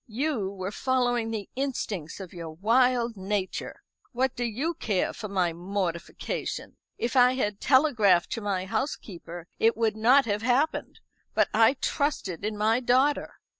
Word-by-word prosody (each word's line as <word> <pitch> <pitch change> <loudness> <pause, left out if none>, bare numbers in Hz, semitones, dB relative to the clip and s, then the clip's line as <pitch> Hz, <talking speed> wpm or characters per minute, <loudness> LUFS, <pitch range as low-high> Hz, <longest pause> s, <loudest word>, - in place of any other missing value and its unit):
You 235 -3 -1
were 195 0 -5
following 245 -2 0
the 215 -3 -4
instincts 220 - -3
of 190 -3 -9
your 170 -2 -7
wild 235 +7 +2
nature. 195 0 -3 0.3
What 260 +1 0
do 245 - -2
you 255 +9 -1
care 210 - -1
for 215 - -6
my 185 -4 0
mortification? 175 -1 -4 0.2
If 235 +1 -2
I 250 0 +6
had 210 -5 -2
telegraphed 230 - +4
to 230 - -3
my 195 -3 -1
housekeeper, 175 - -5
it 225 0 +3
would 225 -2 +1
not 245 +5 +5
have 205 -1 -1
happened. 255 +7 0 0.3
But - - +3
I 225 +5 +5
trusted 245 - -1
in 210 0 -2
my 220 +3 +2
daughter." 260 +4 +2
220 Hz, 150 wpm, -27 LUFS, 195-255 Hz, 0.3 s, I